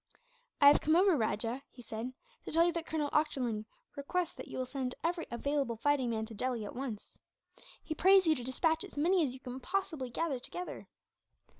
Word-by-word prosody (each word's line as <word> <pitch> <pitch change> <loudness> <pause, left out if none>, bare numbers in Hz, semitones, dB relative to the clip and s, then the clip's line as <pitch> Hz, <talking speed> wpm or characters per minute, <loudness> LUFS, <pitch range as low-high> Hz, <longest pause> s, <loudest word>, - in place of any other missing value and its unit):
"I - - +5
have 290 - +5
come 310 +2 +3
over, 370 0 +5
Rajah," 230 +1 -1
he 245 - -14
said, 225 +3 -5 0.3
"to - - -5
tell 330 +2 +5
you 345 - +3
that 335 -1 -4
Colonel 300 -2 -1
Ochterlony 250 -8 0 0.3
requests 330 +5 -2
that 260 - -9
you - - -7
will 255 - -1
send 255 -1 -3
every 335 0 -1
available 275 0 -1
fighting 275 0 +2
man 220 -1 -1
to 225 - -10
Delhi, 235 0 -2
at - - -8
once. 245 -5 -6 0.6
He 315 - -3
prays 380 +4 +6
you 320 - +5
to 250 -5 -5
despatch 320 +6 +1
as - - -11
many 345 +4 +3
as 260 -4 -2
you - - -11
can 255 0 -7
possibly 330 -5 -2
gather 280 +1 -1
together." 355 +8 -6
275 Hz, 200 wpm, -33 LUFS, 245-325 Hz, 0.6 s, prays